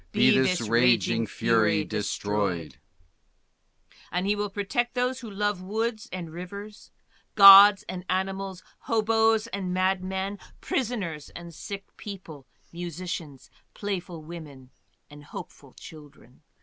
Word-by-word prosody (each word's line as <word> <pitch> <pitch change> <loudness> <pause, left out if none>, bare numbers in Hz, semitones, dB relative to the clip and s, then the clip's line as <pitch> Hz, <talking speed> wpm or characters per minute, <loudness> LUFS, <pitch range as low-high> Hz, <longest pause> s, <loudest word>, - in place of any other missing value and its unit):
BE - - +5
THIS 130 -1 +2
RAGING 115 -1 +3
FURY 105 -1 +1
DESTROYED" 100 -5 -2 1.3
And 180 +2 -1
he 205 +1 +2
will 205 0 -2
protect 225 +5 -2
those 250 +1 0
who 235 - -8
love 205 -1 -2
woods 220 +3 -3
and 175 -3 -6
rivers, 200 +5 -9 0.5
Gods 195 0 +10
and 180 -1 -6
animals, 190 0 -3 0.2
hobos 225 0 +2
and 195 -5 -4
madmen, 190 +1 -1 0.2
prisoners 195 - -3
and 170 -1 -9
sick 200 +4 -7
people, 170 -9 -9 0.3
musicians, 170 -5 -6 0.2
playful 180 -5 -5
women, 150 -6 -11 0.4
and 145 0 -14
hopeful 140 -2 -11
children. 145 -5 -15
185 Hz, 110 wpm, -26 LUFS, 145-205 Hz, 1.3 s, Gods